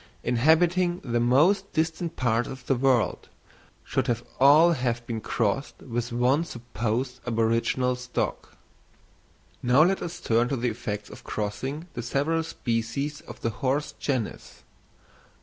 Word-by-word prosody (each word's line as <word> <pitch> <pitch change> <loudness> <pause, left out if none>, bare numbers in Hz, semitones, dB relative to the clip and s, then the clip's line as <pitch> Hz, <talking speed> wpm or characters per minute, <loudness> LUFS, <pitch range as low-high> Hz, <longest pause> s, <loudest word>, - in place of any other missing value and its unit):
inhabiting 170 +8 +3
the 120 -2 0
most 155 +12 +3
distant 160 +1 -1
parts 120 -1 +1
of 130 -1 -9
the - - +2
world, 130 -2 +1 0.5
should 130 -1 -1
have 120 -1 0 0.2
all 150 +6 +7
have 120 -5 -1
been 115 -2 -4
crossed 115 +5 -1
with 120 -1 -3
one 125 +6 +2
supposed 120 -1 -3
aboriginal 115 +2 +1
stock. 125 0 -4 1.0
Now 125 +5 +5
let 190 +3 +2
us 175 0 -5
turn 120 +2 +2
to 135 - -1
the 125 +1 0
effects 105 -3 -5
of - - -12
crossing 130 +9 -4
the 120 - -4
several 145 +7 0
species 140 +1 -3
of - - -10
the 115 - 0
horse 135 +6 -1
genus. 130 -6 -3
125 Hz, 135 wpm, -26 LUFS, 120-150 Hz, 1.0 s, all